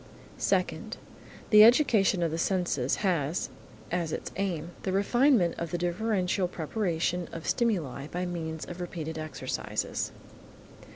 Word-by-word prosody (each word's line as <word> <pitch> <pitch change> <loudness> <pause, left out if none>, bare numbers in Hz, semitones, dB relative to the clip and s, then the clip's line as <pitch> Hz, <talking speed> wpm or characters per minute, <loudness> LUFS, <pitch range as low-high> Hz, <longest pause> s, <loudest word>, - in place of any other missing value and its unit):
Second. - - 0 0.5
The 210 -1 +10
education 220 - +5
of 165 - 0
the 165 - -2
senses 175 -9 +1
has, 165 -3 0 0.4
as 170 -2 -1
its - - -4
aim, 175 -4 -2
the 190 - -2
refinement 205 - +3
of 170 - -3
the 175 - -2
differential 180 +1 0
perception 175 0 -1
of 165 -1 -7
stimuli 165 - 0
by 180 +3 -3
means 160 -3 -4
of 175 0 -7
repeated 160 -2 -5
exercises. 155 0 -3
175 Hz, 125 wpm, -29 LUFS, 160-195 Hz, 0.5 s, The